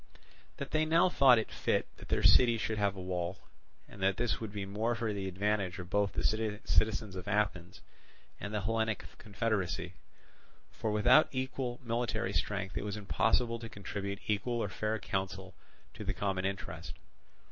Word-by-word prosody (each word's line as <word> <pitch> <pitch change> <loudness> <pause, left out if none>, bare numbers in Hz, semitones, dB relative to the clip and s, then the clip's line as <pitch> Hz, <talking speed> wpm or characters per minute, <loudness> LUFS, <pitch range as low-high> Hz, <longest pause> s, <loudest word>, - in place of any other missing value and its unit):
That - - -5
they 155 0 +3
now 165 +3 +4
thought 135 -7 +6
it 110 - -2
fit - - 0
that - - -12
their - - +1
city 120 -2 +7
should 110 -1 -2
have 100 -1 +1
a - - -7
wall, 90 0 -3 0.5
and 100 - -12
that 95 0 +2
this 120 -2 0
would 110 -2 -4
be 100 -1 -4
more 110 +5 -1
for 115 -2 -1
the 100 -1 -3
advantage 95 -1 0
of 90 -1 -8
both 100 -1 +2
the - - -2
citizens 110 -1 +1
of 90 0 -7
Athens 100 -4 -1 0.6
and 105 - -5
the 105 -1 -1
Hellenic 110 +1 0
confederacy; 100 -4 -2 0.8
for 110 - -3
without 105 +9 +5
equal 130 -2 -3
military 115 -1 -1
strength 100 -2 -1
it - - -4
was 105 0 -3
impossible 110 - +1
to 115 -1 -7
contribute 100 -1 -5
equal 110 +3 0
or 100 - -2
fair 110 +3 -1
counsel 95 -2 -3 0.4
to - - -7
the - - -2
common 95 -2 -1
interest. 85 -5 -5
105 Hz, 170 wpm, -32 LUFS, 95-115 Hz, 0.8 s, city